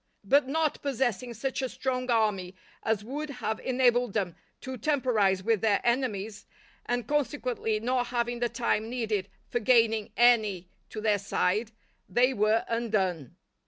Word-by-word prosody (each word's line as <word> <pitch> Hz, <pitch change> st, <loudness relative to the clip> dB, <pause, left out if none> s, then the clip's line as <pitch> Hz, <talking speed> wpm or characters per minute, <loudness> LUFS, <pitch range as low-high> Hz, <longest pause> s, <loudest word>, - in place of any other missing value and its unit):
But 275 Hz, +7 st, +3 dB
not 310 Hz, +2 st, 0 dB
possessing 250 Hz, -3 st, -1 dB
such 265 Hz, +5 st, -2 dB
a 260 Hz, -, -2 dB
strong 255 Hz, 0 st, -3 dB
army 205 Hz, -5 st, +1 dB, 0.3 s
as 220 Hz, -2 st, 0 dB
would 290 Hz, +6 st, -5 dB
have 220 Hz, -5 st, -3 dB
enabled 245 Hz, -3 st, +2 dB
them 185 Hz, -5 st, -1 dB, 0.3 s
to 260 Hz, -1 st, -5 dB
temporize 225 Hz, -8 st, +1 dB
with 220 Hz, -2 st, +1 dB
their 210 Hz, -3 st, +3 dB
enemies, 220 Hz, -4 st, -1 dB, 0.4 s
and 245 Hz, -2 st, -1 dB
consequently 255 Hz, -6 st, -1 dB
not 245 Hz, +2 st, 0 dB
having 240 Hz, 0 st, -1 dB
the 240 Hz, 0 st, 0 dB
time 225 Hz, -3 st, -1 dB
needed 215 Hz, -5 st, -2 dB, 0.2 s
for 240 Hz, -, +1 dB
gaining 225 Hz, -2 st, +3 dB
any 215 Hz, -7 st, +3 dB, 0.2 s
to 215 Hz, -, -6 dB
their 210 Hz, -2 st, +2 dB
side, 200 Hz, +3 st, 0 dB, 0.4 s
they 250 Hz, +3 st, +3 dB
were 215 Hz, 0 st, +2 dB
undone. 195 Hz, -, -1 dB
235 Hz, 145 wpm, -28 LUFS, 210-255 Hz, 0.4 s, But